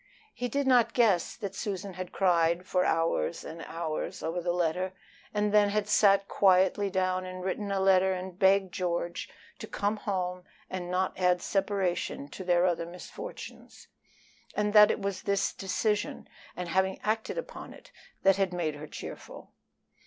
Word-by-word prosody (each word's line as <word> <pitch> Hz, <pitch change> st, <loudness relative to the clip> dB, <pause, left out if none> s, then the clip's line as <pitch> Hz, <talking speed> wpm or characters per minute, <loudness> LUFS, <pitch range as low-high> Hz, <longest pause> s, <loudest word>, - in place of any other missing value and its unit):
He 245 Hz, -, -3 dB
did 280 Hz, +4 st, 0 dB
not 245 Hz, -3 st, +4 dB
guess 210 Hz, -8 st, +3 dB
that 200 Hz, -4 st, -5 dB
Susan 195 Hz, -1 st, -4 dB
had 185 Hz, 0 st, -6 dB
cried 170 Hz, -2 st, +2 dB
for 180 Hz, 0 st, +1 dB
hours 165 Hz, 0 st, 0 dB
and 165 Hz, +1 st, -8 dB
hours 165 Hz, -2 st, -4 dB
over 170 Hz, +2 st, -2 dB
the 175 Hz, 0 st, 0 dB
letter, 180 Hz, +2 st, 0 dB, 0.4 s
and 210 Hz, 0 st, 0 dB
then 205 Hz, -1 st, +5 dB
had 210 Hz, 0 st, 0 dB
sat 200 Hz, -2 st, +4 dB
quietly 190 Hz, +1 st, +3 dB
down 185 Hz, -1 st, 0 dB
and 185 Hz, 0 st, -7 dB
written 200 Hz, +2 st, -2 dB
a 195 Hz, -, 0 dB
letter 190 Hz, 0 st, +4 dB
and 185 Hz, 0 st, -5 dB
begged 190 Hz, -1 st, +4 dB
George 175 Hz, -1 st, -2 dB, 0.3 s
to -, -, -7 dB
come 205 Hz, +2 st, -1 dB
home 180 Hz, -3 st, -3 dB, 0.3 s
and 180 Hz, -1 st, -4 dB
not 185 Hz, +1 st, -1 dB
add 180 Hz, -1 st, +3 dB
separation 190 Hz, -7 st, -1 dB
to 190 Hz, -, -8 dB
their 175 Hz, 0 st, +3 dB
other 170 Hz, -2 st, 0 dB
misfortunes; 175 Hz, +1 st, -10 dB, 0.7 s
and 210 Hz, 0 st, 0 dB
that 210 Hz, 0 st, +9 dB
it -, -, 0 dB
was 195 Hz, -2 st, -2 dB
this 200 Hz, -1 st, 0 dB
decision, 205 Hz, +2 st, -1 dB, 0.3 s
and 180 Hz, -1 st, -4 dB
having 190 Hz, +2 st, +1 dB
acted 220 Hz, -, -1 dB
upon -, -, -6 dB
it, -, -, -15 dB, 0.3 s
that 195 Hz, 0 st, +5 dB
had 195 Hz, -2 st, +1 dB
made 165 Hz, -3 st, -1 dB
her 145 Hz, +1 st, -8 dB
cheerful. -, -, -9 dB
185 Hz, 165 wpm, -29 LUFS, 180-200 Hz, 0.7 s, that